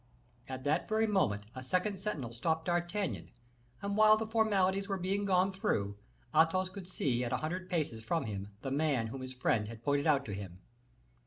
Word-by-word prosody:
At 130 Hz, 0 st, -5 dB
that 145 Hz, +2 st, +1 dB
very 220 Hz, +1 st, +3 dB
moment 185 Hz, -, +1 dB
a 130 Hz, -, -6 dB
second 185 Hz, +8 st, 0 dB
sentinel 150 Hz, -, -3 dB
stopped 160 Hz, +7 st, -1 dB
D'Artagnan, 175 Hz, -, -1 dB, 0.5 s
and 200 Hz, 0 st, -1 dB
while 215 Hz, 0 st, +7 dB
the 220 Hz, -, -2 dB
formalities 200 Hz, -3 st, +2 dB
were 195 Hz, -, -1 dB
being 195 Hz, +3 st, -1 dB
gone 190 Hz, 0 st, +3 dB
through, 100 Hz, -, 0 dB, 0.4 s
Athos 165 Hz, +4 st, +4 dB
could 185 Hz, -1 st, -9 dB
see 125 Hz, -8 st, 0 dB
at 120 Hz, -, -2 dB
a -, -, +2 dB
hundred 180 Hz, +4 st, -4 dB
paces 145 Hz, -11 st, -1 dB
from 145 Hz, +6 st, 0 dB
him 100 Hz, -2 st, -4 dB, 0.2 s
the 135 Hz, -, -3 dB
man 140 Hz, -4 st, +1 dB
whom 135 Hz, +3 st, -6 dB
his 130 Hz, 0 st, -7 dB
friend 110 Hz, -4 st, +1 dB
had 115 Hz, +1 st, -9 dB
pointed 145 Hz, +2 st, +1 dB
out 140 Hz, -3 st, +3 dB
to 105 Hz, -, -5 dB
him. 95 Hz, -3 st, -6 dB
160 Hz, 190 wpm, -33 LUFS, 125-195 Hz, 0.5 s, while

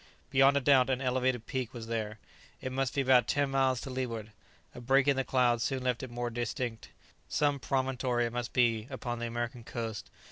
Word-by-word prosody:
Beyond 135 Hz, +1 st, +5 dB
a -, -, +1 dB
doubt 135 Hz, -1 st, +5 dB
an 130 Hz, -1 st, +1 dB
elevated 130 Hz, -2 st, 0 dB
peak 130 Hz, -2 st, -4 dB
was 115 Hz, -1 st, -6 dB
there. 110 Hz, -1 st, -3 dB, 0.4 s
It 130 Hz, -, -5 dB
must 135 Hz, 0 st, -1 dB
be 140 Hz, -, +2 dB
about 130 Hz, -2 st, +4 dB
ten 145 Hz, -1 st, +1 dB
miles 135 Hz, -2 st, +2 dB
to 135 Hz, -, -6 dB
leeward. 115 Hz, -4 st, -4 dB, 0.4 s
A 125 Hz, -, -9 dB
break 135 Hz, +3 st, +3 dB
in 140 Hz, -, +4 dB
the 135 Hz, -, 0 dB
clouds 120 Hz, -3 st, +2 dB
soon 135 Hz, -2 st, -1 dB
left 125 Hz, -2 st, 0 dB
it 130 Hz, -, -6 dB
more 120 Hz, 0 st, -3 dB
distinct. 120 Hz, 0 st, -3 dB, 0.4 s
Some 145 Hz, -1 st, +1 dB
promontory 130 Hz, -1 st, 0 dB
it 115 Hz, -, -4 dB
must 120 Hz, -1 st, -3 dB
be 115 Hz, -3 st, +2 dB
upon 120 Hz, -3 st, -4 dB
the 120 Hz, -, -2 dB
American 120 Hz, +1 st, -4 dB
coast. 115 Hz, -2 st, -5 dB
125 Hz, 205 wpm, -31 LUFS, 120-135 Hz, 0.4 s, Beyond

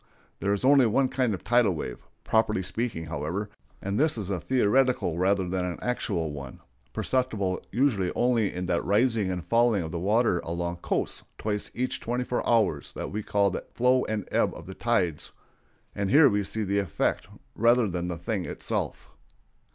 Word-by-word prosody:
There 100 Hz, -, 0 dB
is 100 Hz, +4 st, 0 dB
only 135 Hz, -2 st, +6 dB
one 130 Hz, +4 st, +2 dB
kind 130 Hz, -3 st, 0 dB
of -, -, -11 dB
"tidal 120 Hz, -6 st, +3 dB
wave," 65 Hz, -5 st, -5 dB, 0.2 s
properly 110 Hz, -3 st, +1 dB
speaking, 110 Hz, -3 st, -3 dB
however; 85 Hz, +7 st, -4 dB, 0.3 s
and 100 Hz, +3 st, -1 dB
this 155 Hz, -3 st, +2 dB
is 100 Hz, -3 st, -4 dB
a 95 Hz, -, -1 dB
theoretical 125 Hz, -2 st, +2 dB
rather 95 Hz, 0 st, +2 dB
than 90 Hz, 0 st, -1 dB
an 90 Hz, -1 st, -3 dB
actual 100 Hz, -9 st, -2 dB
one, 70 Hz, -3 st, -8 dB, 0.3 s
perceptible 110 Hz, -8 st, -1 dB
usually 110 Hz, -7 st, +1 dB
only 120 Hz, -4 st, +2 dB
in 90 Hz, +1 st, -4 dB
that 85 Hz, -1 st, 0 dB
rising 110 Hz, 0 st, +2 dB
and 90 Hz, -3 st, -3 dB
falling 115 Hz, -5 st, +3 dB
of 80 Hz, -, -6 dB
the 85 Hz, -, -3 dB
water 105 Hz, 0 st, +2 dB
along 85 Hz, +1 st, -3 dB
coasts -, -, -2 dB, 0.2 s
twice 105 Hz, -1 st, -3 dB
each 130 Hz, +2 st, -2 dB
twenty 125 Hz, +2 st, -2 dB
four 125 Hz, -, -2 dB
hours 105 Hz, -11 st, +2 dB
that -, -, -5 dB
we 105 Hz, +2 st, -3 dB
call 100 Hz, -1 st, +1 dB
the -, -, -4 dB
flow 125 Hz, +1 st, +3 dB
and 110 Hz, -3 st, -3 dB
ebb -, -, +1 dB
of 80 Hz, -, -10 dB
the 95 Hz, -, -8 dB
tides; 95 Hz, -9 st, -1 dB, 0.6 s
and 100 Hz, -1 st, -2 dB
here 145 Hz, +2 st, +7 dB
we 105 Hz, -2 st, 0 dB
see 110 Hz, +3 st, -3 dB
the 100 Hz, 0 st, +1 dB
effect 95 Hz, -7 st, -1 dB, 0.3 s
rather 120 Hz, 0 st, +4 dB
than 90 Hz, -2 st, -3 dB
the 85 Hz, -1 st, -3 dB
thing 95 Hz, +3 st, -2 dB
itself. -, -, -4 dB
100 Hz, 180 wpm, -27 LUFS, 90-120 Hz, 0.6 s, here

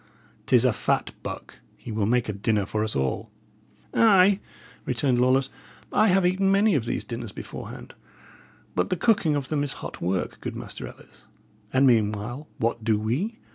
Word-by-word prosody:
'Tis 125 Hz, -1 st, +5 dB
a 125 Hz, -, +4 dB
fat -, -, 0 dB
buck; -, -, -7 dB, 0.2 s
he 120 Hz, -, -8 dB
will 105 Hz, -2 st, 0 dB
make 120 Hz, +1 st, +2 dB
a 105 Hz, -, -2 dB
dinner 100 Hz, 0 st, 0 dB
for 105 Hz, +2 st, -1 dB
us 110 Hz, -, -1 dB
all." 65 Hz, -1 st, -1 dB, 0.6 s
"Ay," 200 Hz, -3 st, +5 dB, 0.4 s
returned 125 Hz, 0 st, +1 dB
Lawless, 130 Hz, +1 st, +3 dB, 0.4 s
"I 215 Hz, -, +4 dB
have 190 Hz, -1 st, +3 dB
eaten 195 Hz, +2 st, +2 dB
many 200 Hz, +1 st, +4 dB
of 135 Hz, -7 st, +1 dB
these -, -, -2 dB
dinners 115 Hz, -3 st, -6 dB
beforehand; -, -, -8 dB, 0.8 s
but 90 Hz, -, 0 dB
the -, -, +1 dB
cooking 175 Hz, -7 st, +3 dB
of 140 Hz, -2 st, -3 dB
them 150 Hz, -2 st, 0 dB
is 145 Hz, -, -2 dB
hot -, -, -8 dB
work, 90 Hz, +1 st, -2 dB
good -, -, -5 dB
Master -, -, -7 dB
Ellis. -, -, -15 dB, 0.4 s
And 130 Hz, +1 st, +4 dB
meanwhile 115 Hz, +3 st, +1 dB
what 115 Hz, 0 st, -1 dB
do 110 Hz, -1 st, +2 dB
we? 150 Hz, -, -1 dB
125 Hz, 175 wpm, -25 LUFS, 110-180 Hz, 0.8 s, Tis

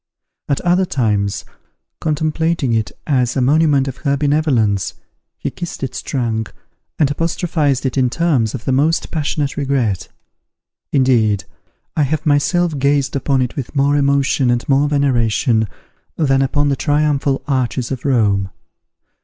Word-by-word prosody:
At 140 Hz, -, +1 dB
other 180 Hz, +2 st, +2 dB
times, 105 Hz, -8 st, -1 dB, 0.5 s
contemplating 155 Hz, -3 st, 0 dB
it 110 Hz, -1 st, 0 dB
as 125 Hz, -4 st, +1 dB
a -, -, +3 dB
monument 140 Hz, +1 st, +3 dB
of 135 Hz, 0 st, -5 dB
her 140 Hz, -1 st, 0 dB
benevolence, 130 Hz, -, +1 dB, 0.4 s
he -, -, -4 dB
kissed 175 Hz, -5 st, -6 dB
its 130 Hz, -, -4 dB
trunk, 115 Hz, -5 st, -2 dB, 0.5 s
and 145 Hz, -3 st, +2 dB
apostrophized 155 Hz, -3 st, 0 dB
it 130 Hz, +1 st, 0 dB
in 125 Hz, -1 st, +2 dB
terms 135 Hz, -7 st, +1 dB
of 120 Hz, -, -7 dB
the -, -, 0 dB
most 150 Hz, +5 st, +1 dB
passionate 145 Hz, -2 st, -2 dB
regret. 130 Hz, -, 0 dB, 0.8 s
Indeed, 115 Hz, -7 st, +2 dB, 0.5 s
I -, -, +1 dB
have 150 Hz, +2 st, 0 dB
myself 155 Hz, +2 st, +2 dB
gazed 140 Hz, 0 st, +1 dB
upon 135 Hz, -1 st, +1 dB
it 125 Hz, -, -5 dB
with 140 Hz, 0 st, -6 dB
more 140 Hz, +1 st, +3 dB
emotion 140 Hz, -2 st, +2 dB
and 120 Hz, 0 st, 0 dB
more 140 Hz, +1 st, +3 dB
veneration 120 Hz, -5 st, +1 dB, 0.5 s
than 135 Hz, -4 st, +2 dB
upon 145 Hz, +2 st, +1 dB
the 140 Hz, -, +1 dB
triumphal 145 Hz, -2 st, 0 dB
arches 130 Hz, -2 st, -1 dB
of 130 Hz, -3 st, -4 dB
Rome. 105 Hz, -8 st, +1 dB
140 Hz, 140 wpm, -18 LUFS, 125-150 Hz, 0.8 s, a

